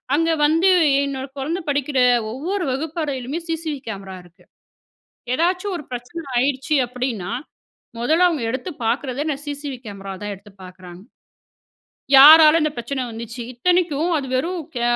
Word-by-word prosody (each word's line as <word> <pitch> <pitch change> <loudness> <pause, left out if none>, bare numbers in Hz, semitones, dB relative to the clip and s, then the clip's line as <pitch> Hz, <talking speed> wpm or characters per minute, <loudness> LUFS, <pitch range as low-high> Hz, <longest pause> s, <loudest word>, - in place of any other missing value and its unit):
அங்க 330 +2 +1 0.2
வந்து 330 +5 +3 0.3
என்னோட 270 -1 -4
குழந்தை 330 +7 -2
படிக்கிற 285 -1 -1 0.4
ஒவ்வொரு 355 +8 -3
வகுப்பறையிலுமே, 290 -1 -3
சிசிவி 320 -3 -3
கேமரா 195 -2 -7
இருக்கு. 175 -1 -22 0.9
ஏதாவது 360 +5 0
ஒரு 325 - -7
பிரச்சனை 250 +7 -6
ஆயிடுச்சு 265 +3 0
அப்படின்னா, 245 -7 -4 0.7
மொதல 320 +9 +3
அவங்க 315 -9 -2
எடுத்து 260 +8 -4 0.2
பாக்கறதே 260 +3 -1
என்ன, 300 -3 -1
சிசிவி 285 -2 -5
கேமராவ 195 -1 -7
தான் 205 -1 -4
எடுத்து 200 +1 -18
பாக்குறாங்க. 180 -1 -12 1.2
யாரால 310 +3 +9
இந்த 305 - +1
பிரச்சனை 255 +3 -3
வந்துச்சு. 230 +2 -7
இத்தனைக்கும் 340 +3 +1
அது 275 - -5
வெறும் 345 +6 -2 0.2
கே 240 - -2
275 Hz, 130 wpm, -21 LUFS, 240-320 Hz, 1.2 s, யாரால